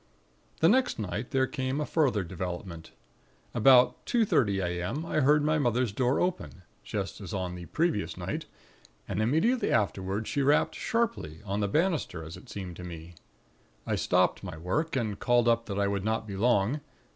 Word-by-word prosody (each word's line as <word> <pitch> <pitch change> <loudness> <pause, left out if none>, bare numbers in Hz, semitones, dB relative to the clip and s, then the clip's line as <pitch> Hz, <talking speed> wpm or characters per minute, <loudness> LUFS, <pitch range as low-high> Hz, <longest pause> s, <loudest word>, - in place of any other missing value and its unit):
"The 165 - +6
next 250 +6 +3
night 110 +3 -4
there 130 0 +2
came 130 +2 -2
a 150 - -1
further 130 -12 +1
development. 90 -1 -6 0.6
About 125 +1 +5
two 235 -3 +2
thirty 100 - +2
a.m., 90 - -2
I 160 - 0
heard 150 +1 +4
my 155 +1 +2
mother's 125 -3 +1
door 125 +5 +1
open, 180 - -2 0.2
just - - -4
as - - -5
on 90 -2 -3
the 90 -1 -8
previous 165 -10 -1
night, - - -4 0.6
and 100 +2 -1
immediately 160 - +2
afterward 100 -1 0
she 140 - 0
rapped 145 +2 +3
sharply, 230 - -2
on 100 +1 -2
the 100 - +1
banister, 155 - 0
as 80 +1 -8
it 130 - -14
seemed 90 -4 -6
to 90 - -8
me. 85 -1 -8 0.7
I - - -1
stopped 90 +2 +2
my 90 -4 -6
work 115 - -1
and 110 -6 -2
called 120 -1 +3
up 115 0 +2
that 100 -2 -4
I 100 - +2
would 100 -1 -1
not 110 +1 -1
be 100 -2 -6
long. 120 +5 +2
110 Hz, 180 wpm, -29 LUFS, 95-145 Hz, 0.7 s, The